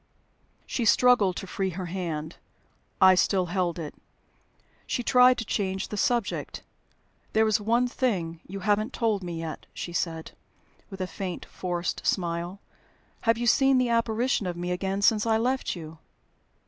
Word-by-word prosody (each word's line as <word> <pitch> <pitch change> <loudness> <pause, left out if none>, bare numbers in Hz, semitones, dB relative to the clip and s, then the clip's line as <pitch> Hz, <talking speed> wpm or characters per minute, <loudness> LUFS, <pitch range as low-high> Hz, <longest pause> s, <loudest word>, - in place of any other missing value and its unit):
She 245 - -2
struggled 225 -4 +4
to - - -5
free 190 0 -2
her 185 +1 -5
hand; 165 -3 -4 0.6
I 190 0 +8
still 185 0 +2
held 180 -3 0
it. 155 -3 -6 0.9
She 245 - -1
tried 250 +1 +6
to 225 - -3
change 190 -2 -2
the - - -4
subject. 235 0 -1 0.7
"There 220 0 +4
is 215 -1 +2
one 235 +4 +2
thing 185 -11 -1
you 195 +1 -7
haven't 210 +3 +1
told 220 -4 0
me 175 -2 -5
yet," 165 -1 -6
she 175 - -5
said, 165 -2 -3 0.6
with 195 -2 -8
a - - 0
faint, 185 -1 -5
forced 175 -1 -3
smile. 175 +1 -1 0.7
"Have 230 - +5
you 240 - -2
seen 270 +2 +4
the 250 -1 +2
apparition 230 -2 +1
of 175 -1 -4
me 175 +1 -3
again 195 +2 -2
since 215 +1 +3
I 220 -1 +3
left 255 +1 0
you?" 160 -2 -9
195 Hz, 160 wpm, -27 LUFS, 175-230 Hz, 0.9 s, I